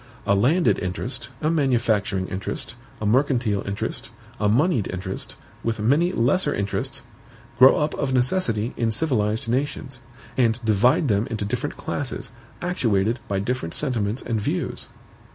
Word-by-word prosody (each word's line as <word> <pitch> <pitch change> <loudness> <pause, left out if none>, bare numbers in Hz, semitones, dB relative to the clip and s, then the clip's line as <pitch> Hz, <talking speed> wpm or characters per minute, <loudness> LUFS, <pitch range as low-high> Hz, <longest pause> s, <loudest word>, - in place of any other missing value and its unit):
A 100 - +3
landed 140 - +3
interest, 95 +7 -3
a 155 +1 +2
manufacturing 115 - +1
interest, 95 +4 -4 0.3
a 110 - -3
mercantile 120 -3 +2
interest, 100 +1 -3 0.3
a 105 0 +2
moneyed 125 - +2
interest, 95 +1 -4 0.3
with 115 -1 -1
many 145 +11 +3
lesser 145 +4 +2
interests, 100 0 -2 0.6
grow 130 +1 +9
up 150 +1 0
of 135 -2 -1
necessity 125 - +1
in 115 -1 0
civilized 110 -4 0
nations, 130 0 -2 0.4
and 120 -2 +2
divide 115 - +4
them 105 +1 +2
into 110 -5 -3
different 125 +7 -3
classes, 140 -3 -3 0.3
actuated 115 - +1
by 100 - -1
different 105 -3 -2
sentiments 120 -5 -1
and 115 -3 -1
views. - - -2
115 Hz, 135 wpm, -24 LUFS, 105-135 Hz, 0.6 s, grow